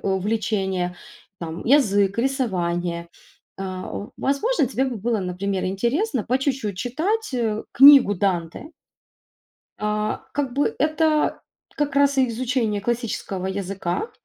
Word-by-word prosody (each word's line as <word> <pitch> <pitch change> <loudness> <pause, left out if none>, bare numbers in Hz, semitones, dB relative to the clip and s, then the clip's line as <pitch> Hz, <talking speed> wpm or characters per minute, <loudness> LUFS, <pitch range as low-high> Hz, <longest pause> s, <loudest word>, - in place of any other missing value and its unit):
увлечения, 190 -2 -1 0.4
там: 165 0 -6
язык, 205 -7 +3
рисование. 175 -10 -1 0.5
Э, - - -4
о, 190 +4 -6
возможно, 290 - +1
тебе 260 +1 0
бы 250 -3 -3
было, 225 +2 -1
например, 185 +1 -2
интересно 240 - 0
по 255 +2 +1
чуть-чуть 260 -8 -2
читать, 340 - -1
э, 220 -3 -1
книгу 275 -5 +8
Данте. 180 - -2 1.1
А, 210 0 -2
как 280 -3 -2
бы 285 - +1
это 310 +1 +1 0.4
как 290 -1 -1
раз 280 0 +3
и 260 - +4
изучение 230 -3 -1
классического 215 -4 -3
языка 195 - -3
220 Hz, 120 wpm, -23 LUFS, 190-270 Hz, 1.1 s, книгу